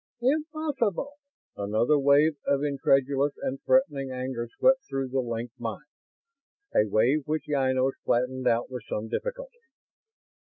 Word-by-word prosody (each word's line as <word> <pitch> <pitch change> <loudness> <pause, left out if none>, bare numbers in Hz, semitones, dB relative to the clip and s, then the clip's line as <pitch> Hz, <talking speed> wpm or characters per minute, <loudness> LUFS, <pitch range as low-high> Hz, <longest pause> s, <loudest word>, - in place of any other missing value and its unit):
"Impossible!" 290 - -1 0.4
Another 110 +9 +1
wave 145 +3 +4
of 140 0 +2
incredulous 140 0 +2
and 135 +1 -4
threatening 145 - +2
anger 125 -2 -4
swept 265 0 +4
through 135 -1 -2
the 135 +1 0
linked 120 0 -4
minds; 115 +5 -5 0.9
a 105 - +3
wave 130 +8 +2
which 155 +1 -1
Ynos 130 -2 +1
flattened 125 +1 0
out 115 +2 +1
with 125 -1 -5
some 110 +1 -3
difficulty. - - -5
135 Hz, 125 wpm, -27 LUFS, 125-155 Hz, 0.9 s, wave